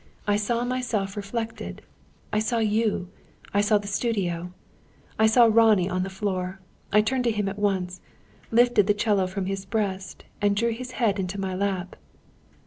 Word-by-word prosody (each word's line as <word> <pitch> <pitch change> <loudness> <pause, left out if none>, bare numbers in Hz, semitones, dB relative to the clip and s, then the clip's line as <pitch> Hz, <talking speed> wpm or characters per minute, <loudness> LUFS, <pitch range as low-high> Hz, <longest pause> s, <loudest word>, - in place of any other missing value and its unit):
I 205 - +2
saw 235 +3 0
myself 240 -6 -2
reflected, 225 +3 -5 0.5
I 210 - +3
saw 225 +2 0
you, 215 -4 +1 0.4
I 200 - +4
saw 210 +1 +4
the 205 0 -6
studio; 190 -5 -1 0.7
I 220 - +6
saw 235 +2 +6
Ronnie 220 -5 +4
on 185 0 0
the 190 - -2
floor. 190 -1 -3 0.3
I 210 +1 +6
turned 250 +4 0
to - - +4
him 210 -2 -1
at 200 +1 -4
once, 190 -3 -1 0.5
lifted 235 -3 +4
the 205 - +3
'cello 205 -3 +2
from 185 +1 -3
his 195 0 -3
breast, 195 -1 -3 0.2
and 205 0 +3
drew 235 +3 +1
his 250 +2 -6
head 215 -5 +1
into 190 +1 -3
my 190 -1 -2
lap." 190 -1 -2
205 Hz, 170 wpm, -25 LUFS, 190-225 Hz, 0.7 s, I